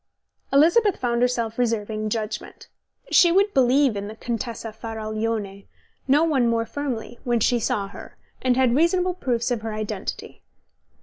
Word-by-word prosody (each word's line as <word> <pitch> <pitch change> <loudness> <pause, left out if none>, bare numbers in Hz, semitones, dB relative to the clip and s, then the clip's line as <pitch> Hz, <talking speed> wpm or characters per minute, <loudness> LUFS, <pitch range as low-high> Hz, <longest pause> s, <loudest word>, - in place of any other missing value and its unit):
Elizabeth 345 +9 +4
found 240 -1 -1
herself 235 -2 0
reserving 215 -2 -1
judgment. 215 -1 -5 0.4
She 345 - +6
would 400 +3 +3
believe 265 -1 +3
in 200 0 -4
the 215 - -8
Contessa 230 -1 -5
Faraglione 215 -2 -4 0.4
no 285 +4 +4
one 275 -7 +2
more 230 0 +1
firmly 240 -3 -5
when 240 -1 +1
she 240 +2 +2
saw 205 -2 -1
her, - - -12 0.2
and 255 -1 +2
had 255 -2 +3
reasonable 360 +4 +2
proofs 245 -8 -1
of 235 -3 -1
her 220 -1 -4
identity. 215 -2 -5
235 Hz, 145 wpm, -23 LUFS, 220-270 Hz, 0.4 s, She